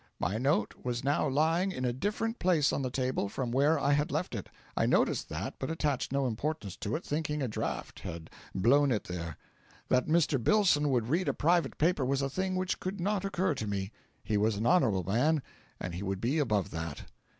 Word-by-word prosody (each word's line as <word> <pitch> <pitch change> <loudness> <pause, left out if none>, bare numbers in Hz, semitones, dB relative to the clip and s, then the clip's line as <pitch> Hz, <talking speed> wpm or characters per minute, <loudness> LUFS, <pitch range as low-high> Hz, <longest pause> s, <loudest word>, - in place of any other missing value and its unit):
My 95 +7 -1
note 125 -5 +1
was 120 -1 -2
now 145 +2 +2
lying 165 +7 +2
in 130 -8 -3
a 120 - +1
different 215 - -2
place 170 -6 +3
on - - 0
the 130 - -1
table 130 -5 -1
from 125 +2 -3
where 145 +5 +3
I 140 0 +1
had 145 +1 +1
left 155 +2 -2
it. 100 -5 -5 0.3
I - - +2
noticed - - +2
that, - - -4
but 130 - -3
attached 150 -6 -1
no 140 0 +1
importance 120 - -3
to 105 - -2
it, 160 - -4
thinking 150 -1 -1
a - - 0
draught 110 - -4
had 80 -1 -7 0.2
blown 135 +8 +4
it 110 - 0
there. 85 -4 -5 0.5
That 125 0 +3
Mr. 155 -5 +2
Billson 175 - +4
would 120 -3 +1
read 175 +6 +1
a - - +1
private 170 +2 +2
paper 165 -2 +2
was 135 +2 +1
a 135 - -1
thing 185 +4 -1
which 185 0 -1
could 190 +2 -4
not 200 +2 0
occur 190 -4 +1
to 110 -6 -4
me; 100 0 -2 0.3
he 105 - 0
was 105 +1 +2
an 105 +3 -2
honourable 115 - +3
man, 130 - +2 0.4
and 90 - -4
he 90 - -5
would 95 -1 -2
be 130 +9 +1
above 105 - +1
that. 80 -2 -5
135 Hz, 215 wpm, -31 LUFS, 110-160 Hz, 0.5 s, blown